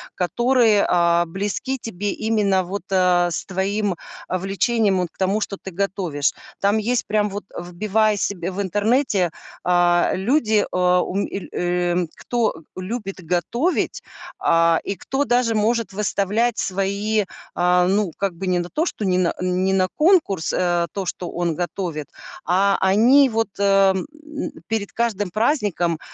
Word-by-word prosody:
которые, 235 +2 +3
а, 170 -1 +3
близки 205 +9 -3
тебе, 205 -3 -4
именно 210 -4 +1
вот, 190 +1 -5
э, 180 -2 +3
с 165 - -3
твоим, 195 +1 -1 0.3
а, 185 - -1
влечением, 195 +2 +1
вот 180 -2 -1
к - - -34
тому, 195 +3 0
что 200 - -3
ты 190 - -7
готовишь. 180 -6 -1 0.3
Там 200 +2 +3
есть 235 +2 0
прям 210 0 +1
вот: 205 +1 -6 0.2
вбивая 210 +5 0
себе 185 -2 -2
в 195 +2 -3
интернете, 205 - +1 0.3
а, 175 -1 +3
люди, 215 +1 +2
э, 180 0 +3
ум 195 +2 -1
эль 195 - -6
эм, 175 0 0
кто 230 -9 -2
любит 195 +1 -5
готовить, 210 - -1 0.4
а, 165 0 +3
и 200 - -3
кто 270 +8 -2
даже 240 -3 +2
может 225 +1 +1
выставлять 210 +3 0
свои, 200 +2 0 0.3
а, 180 0 +3
ну, 195 -1 +1
как 195 -3 -1
бы, 190 +3 -5
не 180 -1 +2
на 175 0 -4
то, 315 - 0
что 215 - -3
не 185 -1 +2
на 180 -2 +1
не 185 +1 +1
на 185 -1 +2
конкурс, 305 - +2
э, 175 -1 +1
то, 195 -2 -3
что 175 0 -4
он 170 -2 -1
готовит. 175 -3 -4 0.4
А 195 +4 +3
они 235 +9 +5
вот, 225 -1 0
э, 195 -1 +4
м, 190 - -3 0.6
перед 215 -3 -2
каждым 210 -4 -1
праздником, 205 - 0
195 Hz, 155 wpm, -21 LUFS, 180-215 Hz, 0.6 s, они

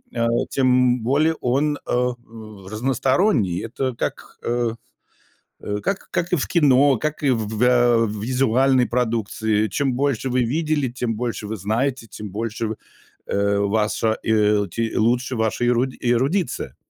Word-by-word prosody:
а, 115 0 +1 0.2
тем 125 -2 +2
более 150 +7 +2
он, 145 +4 +1
э, 125 0 +1 0.6
разносторонний. 125 - +1
Это 130 +3 -3
так, - - -5
э, 120 -1 0 0.9
э, 105 0 -3
как, 195 0 -3
как 170 - -2
и 180 - +4
в 135 - -1
кино, 140 -4 +4
как 155 +2 -3
и 140 - +4
в 115 -4 0
в 110 +2 -3
э, 120 -2 +4
визуальной 125 +4 +2
продукции. 110 -2 0
Чем 135 +6 0
больше 135 -1 -1
вы 125 0 +2
видели, 150 +2 0
тем 120 -1 -3
больше 115 -2 -3
вы 110 - -3
знаете, 115 +6 -1
тем 105 -1 -8
больше, 115 +2 -3
в, 110 - -4 0.5
э, 100 0 +1
ваша, 110 +2 0
э, 105 -2 +2
те 115 -1 -2
лучше 120 +3 +1
ваша 110 +2 0
эру 120 +1 +3
эрудиция. 130 +8 -1
120 Hz, 145 wpm, -22 LUFS, 110-135 Hz, 0.9 s, и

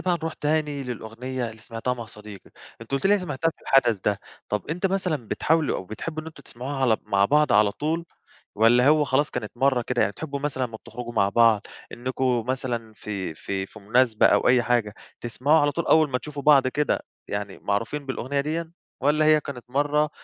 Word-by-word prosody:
بقى 180 -1 +1
نروح 160 -1 -3
تاني 150 -2 -1
للأغنية 125 +1 -5
اللي 110 0 -14
سمعتيها 115 +2 -3
مع 120 -2 -7
صديقِك، 105 -2 -12 0.3
أنتِ 115 - -12
قُلتِ 140 +8 +1
لي 205 +1 +4
سمعتيها 165 -2 -1
في - - -23
الحدث 120 -6 +3
ده. 100 +1 0 0.3
طب 105 +7 -3
إمتي 180 +4 0
مثلًا 180 - -2
بتحاولوا 160 -2 +1
أو - - -6
بتحبوا 155 - -6
إن - - -13
أنتم 155 -3 -11
تسمعوها 130 +4 -6
على 125 -5 +3
مع 100 -1 +2
بعض 150 +3 +3
على 105 0 +4
طول، 160 +7 -2 0.5
والّا 120 +4 +5
هو 150 0 +5
خلاص 145 +2 +1
كانت 110 -4 -5
مرة 130 -1 +2
كده؟ 125 +1 -1
يعني 100 - +1
تحبوا 140 +3 -5
مثلًا 140 -2 -2
لمّا 115 -2 -8
بتخرجوا 120 +1 -8
مع 100 -3 +3
بعض 115 -2 +4 0.3
إنكم 125 -1 -1
مثلًا 120 -4 -3
في 100 -6 -5
في 95 +4 -4
في 110 - -14
مناسبة، 110 +2 +3
أو - - +4
أي 125 -1 +5
حاجة، 115 -4 +1 0.3
تسمعوا 135 +6 +2
على 145 0 +2
طول 170 - -3
أول 155 -2 +4
ما 125 - 0
تشوفوا 145 +1 -7
بعض 140 -3 +6
كده، 150 +3 0 0.3
يعني 100 -1 -4
معروفين 115 +8 -2
بالأغنية 135 +1 -2
ديًا، 160 +2 -3 0.3
والّا 150 +2 +3
هي 155 0 +6
كانت 125 -4 -8
مرة 145 +3 +1
130 Hz, 200 wpm, -25 LUFS, 110-150 Hz, 0.5 s, بعض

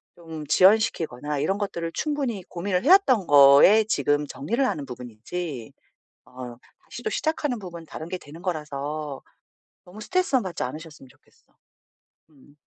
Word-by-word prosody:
좀 160 -3 -9
지연시키거나 155 - +2
이런 190 +7 0
것들을 170 -5 -4
충분히 275 -9 -2
고민을 180 +5 -3
해 - - +3
왔던 260 - +5
거에 145 +9 +7
지금 145 -7 0
정리를 235 - -2
하는 155 - -2
부분이지 125 +3 -7 0.5
어 125 -1 -9 0.3
다시 - - -10
또 435 - -1
시작하는 300 - -1
부분은 170 -4 -9
다른 160 - -8
게 185 +1 -5
되는 155 +3 -13
거라서 150 -3 -4 0.6
너무 185 +4 -12
스트레스만 270 - 0
받지 185 -2 -5
않으셨으면 150 +1 -7
좋겠어. - - -28 0.7
음. 145 0 -22
165 Hz, 335 characters per minute, -24 LUFS, 145-210 Hz, 0.7 s, 거에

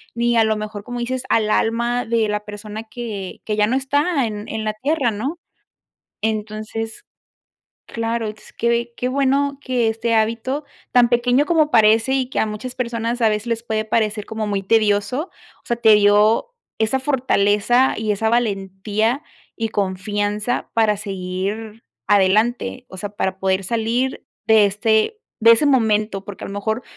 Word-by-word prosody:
ni 235 0 +1
a 225 - +6
lo 220 - +1
mejor, 210 -1 -6
como 245 0 -5
dices, 255 +2 -3
al 215 -1 +2
alma 235 +3 +1
de 225 -1 +1
la 210 0 -2
persona 210 +1 -7
que 215 -4 -6
que 210 - -1
ya 210 - +3
no 245 - 0
está 285 +2 +1
en 210 -1 -6
en 220 0 -3
la 215 - -1
tierra, 265 +1 0
¿no? 270 +11 -4 0.8
Entonces, 215 +1 -4 0.8
claro, 230 -1 -2
es 215 0 -11
que 235 0 0
qué 250 - -1
bueno 280 +1 +1
que 250 -4 0
este 225 +1 -1
hábito 230 +6 0 0.3
tan 245 -1 +5
pequeño 245 +4 +3
como 315 -3 +3
parece, 225 +3 +4
y 260 -2 -1
que - - -1
a - - +2
muchas 215 +4 -6
personas 235 0 -2
a 225 - +5
veces 210 +2 -2
les 230 0 -1
puede 220 -2 -1
parecer 215 -1 0
como 220 -1 -3
muy 200 -1 -1
tedioso, 215 - +1 0.3
o - - -33
sea, 235 - 0
te 220 -2 +6
dio 210 - +3 0.3
esa 220 +4 +1
fortaleza, 245 -2 +2
y 215 -1 0
esa 220 +2 0
valentía, 215 +2 0 0.3
y 225 -1 -1
confianza 205 +4 -2
para 220 -2 +3
seguir 200 +3 -5 0.2
adelante, 215 +6 +2
o 190 - -10
sea, 205 +2 -5
para 190 -2 -2
poder 190 0 0
salir 235 +5 -1 0.2
de 220 -2 +6
este 220 - +1 0.2
de 230 +1 +8
ese 230 +6 +3
momento. 215 -6 +2
Porque 205 -2 -8
a - - -6
lo 200 - -7
mejor 220 +4 -2
220 Hz, 165 wpm, -20 LUFS, 210-240 Hz, 0.8 s, de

